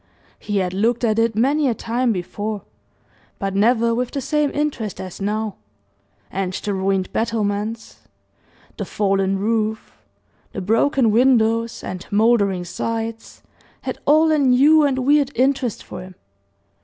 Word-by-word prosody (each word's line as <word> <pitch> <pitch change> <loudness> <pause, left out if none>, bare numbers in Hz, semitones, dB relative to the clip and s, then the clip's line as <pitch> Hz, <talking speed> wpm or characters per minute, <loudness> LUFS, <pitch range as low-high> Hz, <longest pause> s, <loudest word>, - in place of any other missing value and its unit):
He 205 -1 -3
had 185 -2 0
looked 230 +5 0
at 220 -1 +2
it 225 -1 +1
many 280 +6 +2
a 235 - 0
time 235 +3 -1
before, 205 +2 -4 0.7
but 195 -1 -3
never 230 +3 +3
with 245 +1 -1
the 280 - -4
same 300 +2 0
interest 280 -9 -3
as 185 +1 -8
now; 210 +1 -2 0.7
and 190 -1 -2
the 205 +1 -3
ruined 190 -1 -1
battlements, 220 -1 -2 0.8
the - - -3
fallen 195 -1 0
roof, 220 +1 -2 0.6
the 195 - -4
broken 225 +4 +2
windows, 230 -1 +2
and 185 0 -6
mouldering 205 -4 +2
sides, 225 +4 -5 0.4
had - - -5
all 315 +2 +5
a 305 - +3
new 280 +4 +5
and 280 -3 +2
weird 285 -1 +4
interest 260 -2 0
for - - -8
him. 185 0 -11
225 Hz, 140 wpm, -21 LUFS, 200-250 Hz, 0.8 s, all